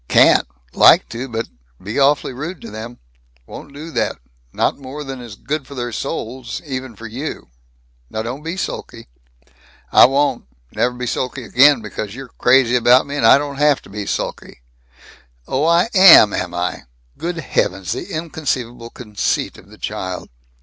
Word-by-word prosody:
"Can't. - - +5 0.3
Like - - +6
to, 120 +4 -5
but 115 0 -3 0.3
Be 105 +8 -4
awfully 140 -1 +2
rude 155 +7 -6
to - - -9
them. 110 +3 -8 0.5
Won't - - -11
do 155 +4 -9
that - - -1 0.4
not - - 0
more 140 +2 -7
than 135 -2 -7
is 115 -4 -10
good 140 +4 -4
for 140 - -10
their 120 -1 -4
souls 120 +2 -5
even 130 -4 -6
for 115 - -11
you. 125 - -6 0.6
Now 110 - -4
don't 125 +5 -5
be 165 +4 -5
sulky." 190 - -6 0.8
"I - - +8
won't. 140 +3 +1 0.3
Nev' 125 0 -1
be 125 - -4
sulky 125 +2 -3
again, 130 +3 +4
because 105 0 -6
you're 130 -2 -10
crazy 125 -1 +4
about 125 +1 +5
me, 140 - -6
and 115 -6 +3
I - - +8
don't 140 -1 -4
have 150 -1 +3
to - - -15
be 105 -1 -5
sulky." - - -4 0.9
"Oh, 140 +4 0
I 170 +4 +4
am, 185 - +8
am 90 -1 -2
I! 90 -5 -3 0.3
Good 175 +1 -3
heavens, 95 - -1
the - - -4
inconceivable 130 -7 -4
conceit 105 -4 -3
of - - -19
the - - -15
child!" 95 -1 -5
130 Hz, 170 wpm, -19 LUFS, 115-145 Hz, 0.9 s, I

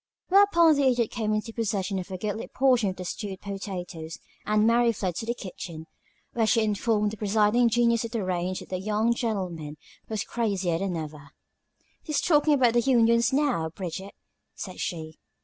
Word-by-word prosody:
Whereupon 365 -5 +6
the 280 -1 +3
Idiot 245 -3 +1
came 220 -3 -2
into 215 +1 -2
possession 200 -4 -1
of 180 - -7
a 185 - -4
goodly 210 +3 -4
portion 250 -6 +2
of 185 - -5
the 180 - -7
stewed 190 +1 -5
potatoes, 180 -5 -6 0.3
and 210 0 +3
Mary 235 +1 +4
fled 185 -4 -2
to 225 - -4
the 235 - -1
kitchen, 170 -6 -8 0.5
where 225 -2 +1
she 225 0 +3
informed 210 0 +1
the 215 - -8
presiding 215 +3 +3
genius 235 0 +2
of 230 - -4
the 225 -3 -2
range 185 0 -2
that - - -12
the 185 - -3
young 215 +4 +1
gentleman 180 - -3 0.3
was 215 -2 -2
crazier 195 -7 -1
than 190 -2 -2
ever. 150 -2 -7 0.7
"He's 300 -3 -1
talkin' 300 -2 +3
about 245 -4 +3
the 240 - +4
unions, 235 -2 +3
now, 265 - +1
Bridget," 190 +3 -7 0.4
said 185 -2 -7
she. 160 -2 -5
215 Hz, 180 wpm, -26 LUFS, 185-235 Hz, 0.7 s, Whereupon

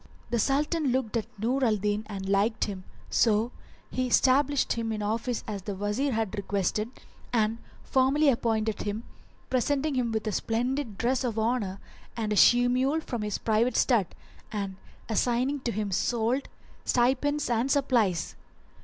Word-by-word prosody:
The 235 - +1
Sultan 295 - +1
looked 250 -3 0
at 225 - -1
Nur 250 +6 0
al 225 -4 +3
Din 210 +1 -1
and 195 -2 -5
liked 205 +3 +2
him, 190 -3 -4 0.3
so 225 +1 +3 0.4
he 255 0 -1
stablished 275 +3 +3
him 230 -1 -2
in 210 -1 -3
office 225 +3 -1
as 205 -3 -4
the 200 +1 -5
Wazir 210 +8 -1
had 220 -2 -1
requested 200 +2 -1 0.4
and 225 -1 +1 0.2
formally 275 +3 +3
appointed 225 -4 +1
him, 210 +2 -3 0.5
presenting 280 +4 +1
him 250 -3 0
with 220 0 -2
a 215 - -1
splendid 235 +1 -1
dress 255 +5 +1
of 235 -3 -2
honour 220 -4 0 0.4
and 215 -2 -1
a - - 0
she 245 +7 +6
mule 260 +5 +2
from 240 -7 -4
his 210 -1 -2
private 225 +3 +1
stud; 225 -8 +3 0.4
and 200 -3 -3 0.3
assigning 245 +5 +1
to 245 -2 -2
him 210 -1 -2
solde, 235 +7 0 0.3
stipends 270 +4 +1
and 240 +2 +1
supplies. 240 - +1
230 Hz, 155 wpm, -28 LUFS, 210-255 Hz, 0.5 s, she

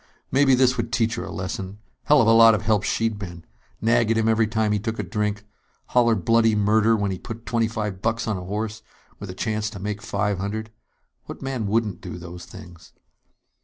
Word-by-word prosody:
Maybe 135 -1 +4
this 125 0 +3
would 115 0 -2
teach 115 -2 +1
her - - -4
a - - -7
lesson! 95 +1 -5 0.3
Hell 150 -2 +5
of - - +1
a - - +6
lot 115 -1 +7
of 105 - -4
help 110 -2 +2
she'd 110 0 -1
been! 85 -4 -8 0.4
Nag 115 0 +3
at 115 - +2
him 110 0 +1
every 110 0 +3
time 110 -1 0
he 105 - +1
took 110 +2 -4
a - - -2
drink. 105 -2 -2 0.4
Holler 120 -2 +4
bloody 115 +3 +3
murder 110 +2 +3
when 100 -2 -1
he 95 - -4
put 115 0 -8
twenty 115 -2 +1
five 105 -4 -4
bucks 115 +2 -1
on 110 - 0
a 90 - -6
horse, 105 +3 -4 0.4
with 100 - -7
a 90 - -7
chance 110 +1 -2
to 105 -3 -9
make 105 +2 -4
five 100 -2 -1
hundred. 110 +3 -4 0.5
What - - -9
man 130 -5 -3
wouldn't 105 -3 0
do 90 - -7
those 90 0 -9
things? 85 -6 -13
110 Hz, 215 wpm, -23 LUFS, 100-115 Hz, 0.5 s, lot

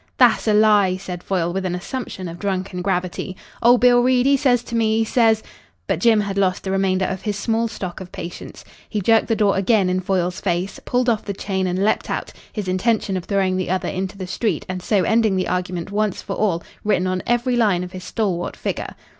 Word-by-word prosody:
"Tha'ss 240 -3 +4
a 215 - +4
lie," 205 -3 +4
said 180 -2 -7
Foyle, 175 -3 -1
with 190 0 -2
an 180 -1 -1
assumption 190 -1 -5
of 170 +1 -8
drunken 190 -2 -2
gravity. 185 0 -2 0.2
"Old 240 +1 +5
Bill 245 0 +6
Reid 250 0 +3
he 280 +1 +5
says 250 -3 +2
to - - -10
me, 220 -1 +2
he 225 - +2
says 225 -1 +3 0.2
" 85 +1 -38
But - - 0
Jim 220 +1 +4
had 200 -1 -2
lost 185 -2 +1
the 190 - -3
remainder 190 -1 +1
of 190 0 -3
his 210 -2 -2
small 225 +2 0
stock 185 -5 -6
of 180 - -9
patience. 170 +1 -8 0.2
He 215 - -1
jerked 225 +3 +3
the 225 - +1
door 205 -2 +2
again 195 -1 +2
in 185 - +1
Foyle's 180 -1 -1
face, 185 +1 -2
pulled 250 0 +1
off 225 -3 +1
the 200 - -4
chain 190 -1 -2
and 180 +2 -1
leapt 215 - 0
out, - - -3 0.2
his 210 -4 -4
intention 195 +2 0
of 180 -2 -3
throwing 190 -2 +1
the 185 - -2
other 185 0 -1
into 190 +1 -4
the 190 - -5
street 195 +5 -2
and 185 0 -4
so 200 0 +1
ending 220 +1 +2
the 185 - 0
argument 180 0 -3
once 210 -1 0
for - - -4
all 180 -6 0 0.2
written 205 -4 +1
on 185 0 -1
every 240 +1 +1
line 205 -7 +2
of 180 - -7
his 185 0 -8
stalwart 185 -3 -2
figure. - - -4
195 Hz, 230 wpm, -21 LUFS, 185-220 Hz, 0.2 s, Bill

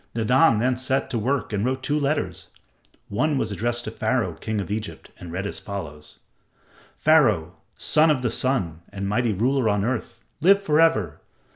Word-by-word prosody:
Nadan 125 +3 +4
then 125 +3 +1
set 130 +2 -1
to 120 - -1
work 130 +1 -1
and 100 0 0
wrote 130 +2 -1
two 150 +2 0
letters. 145 +1 -2 0.6
One 145 +8 0
was 110 -4 -1
addressed 120 +3 -1
to - - -5
Pharaoh, - - -1
king 110 -1 -4
of 100 - -4
Egypt, 105 0 -5
and 85 - -9
read 95 +3 -3
as 100 - -5
follows: 75 -7 -8 0.8
"Pharaoh, 110 - +3 0.2
son 155 +1 +3
of 140 -5 +1
the 120 - 0
Sun 95 -12 -1
and 100 0 -5
mighty 115 +3 +1
ruler 120 +4 +1
on 105 -1 +1
earth, 125 0 -4 0.2
live 195 +5 +6
for 160 -5 +2
ever! 160 - +2
120 Hz, 175 wpm, -24 LUFS, 100-135 Hz, 0.8 s, live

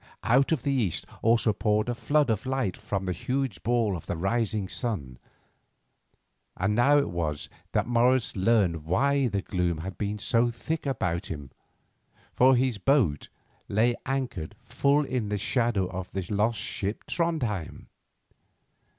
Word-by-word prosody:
Out 135 +6 +3
of 150 -7 +1
the 140 - +1
east 115 - 0 0.2
also 115 -1 +3
poured 105 +1 +1
a 120 - 0
flood 145 +2 +2
of 110 +3 -2
light 130 -9 -1
from 95 -1 -3
the 90 - -1
huge 130 +3 -2
ball 115 -4 +1
of 85 - -8
the 90 - -2
rising 105 +2 0
sun, 80 - -4 1.4
and 95 +3 +1
now 135 +6 +5
it 145 - +1
was 80 -4 -3 0.2
that - - +2
Morris 120 +1 +2
learned 95 -6 +2
why 135 - +2
the 100 -3 -2
gloom 90 -3 -1
had 95 +2 -7
been 105 0 -2
so 115 +3 +2
thick 145 +6 -4
about 90 -10 -1
him, 70 -4 -7 0.8
for 130 +1 +5
his 125 -3 +1
boat 105 - +2 0.4
lay 115 +4 +2
anchored 125 -12 -3
full 145 +1 +2
in 125 -6 -2
the 105 - -1
shadow 115 -1 +1
of 95 0 -6
the 95 - -2
lost 105 +3 +1
ship 105 0 -3
Trondhjem. 135 - -2
110 Hz, 150 wpm, -27 LUFS, 95-130 Hz, 1.4 s, now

